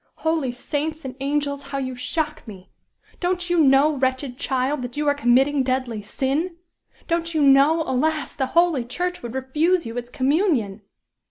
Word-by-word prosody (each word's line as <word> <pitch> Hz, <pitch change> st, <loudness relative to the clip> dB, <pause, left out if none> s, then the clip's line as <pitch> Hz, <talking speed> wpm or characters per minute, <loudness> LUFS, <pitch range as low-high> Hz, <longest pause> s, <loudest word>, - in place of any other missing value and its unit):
Holy 320 Hz, -5 st, +1 dB
saints 300 Hz, +5 st, -4 dB
and 260 Hz, -1 st, -6 dB
angels! 280 Hz, 0 st, -1 dB
how 275 Hz, -, -6 dB
you 260 Hz, -2 st, -3 dB
shock 305 Hz, +4 st, -2 dB
me. 190 Hz, -3 st, -11 dB, 0.5 s
Don't 355 Hz, 0 st, -1 dB
you 350 Hz, -, +3 dB
know, 285 Hz, +1 st, +5 dB
wretched 260 Hz, -1 st, -1 dB
child, 265 Hz, +2 st, -1 dB
that 245 Hz, +2 st, -7 dB
you 300 Hz, 0 st, -1 dB
are 285 Hz, -, +4 dB
committing 270 Hz, +1 st, +3 dB
deadly 255 Hz, -4 st, -1 dB
sin? 280 Hz, -, -2 dB, 0.5 s
Don't 335 Hz, -1 st, -1 dB
you 310 Hz, -, +2 dB
know, 280 Hz, +4 st, +5 dB
alas! 305 Hz, +3 st, -1 dB
the 265 Hz, -2 st, -1 dB
holy 340 Hz, -7 st, +4 dB
church 355 Hz, +9 st, -3 dB
would 240 Hz, +1 st, -7 dB
refuse 310 Hz, +7 st, +1 dB
you 230 Hz, +1 st, -6 dB
its 240 Hz, 0 st, -5 dB
communion?" 260 Hz, -, 0 dB
275 Hz, 165 wpm, -23 LUFS, 255-315 Hz, 0.5 s, know